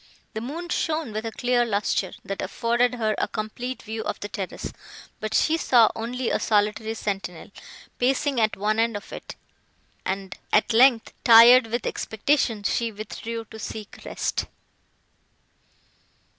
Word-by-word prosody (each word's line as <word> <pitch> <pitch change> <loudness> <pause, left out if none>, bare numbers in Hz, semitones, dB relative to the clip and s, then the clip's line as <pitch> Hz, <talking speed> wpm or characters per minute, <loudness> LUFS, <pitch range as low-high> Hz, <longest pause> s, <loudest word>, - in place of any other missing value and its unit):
The 220 - -4
moon 325 +9 -6
shone 315 -6 -1
with 215 +2 -3
a - - -4
clear 245 +1 +1
lustre, 205 -4 -1
that 195 - -4
afforded 235 +5 +1
her 220 -3 0
a - - +1
complete 235 +3 -5
view 220 +1 -5
of - - -4
the 205 - -6
terrace; 195 -4 -5 0.5
but 215 0 -3
she 325 +1 +3
saw 240 -8 +5
only 240 +2 -3
a - - +1
solitary 215 +1 +1
sentinel, 195 -5 -4 0.5
pacing 265 0 +1
at 215 0 +1
one 215 +2 0
end 230 -1 +1
of 205 - -11
it; - - -8 0.7
and, 195 0 -4 0.2
at 215 +2 +3
length, 240 0 +5
tired 235 +1 +8
with 235 +1 -3
expectation, 225 -1 0
she 230 +3 0
withdrew 225 +2 -6
to 220 - -9
seek 215 -1 -7
rest. - - -2
225 Hz, 145 wpm, -25 LUFS, 215-245 Hz, 0.7 s, tired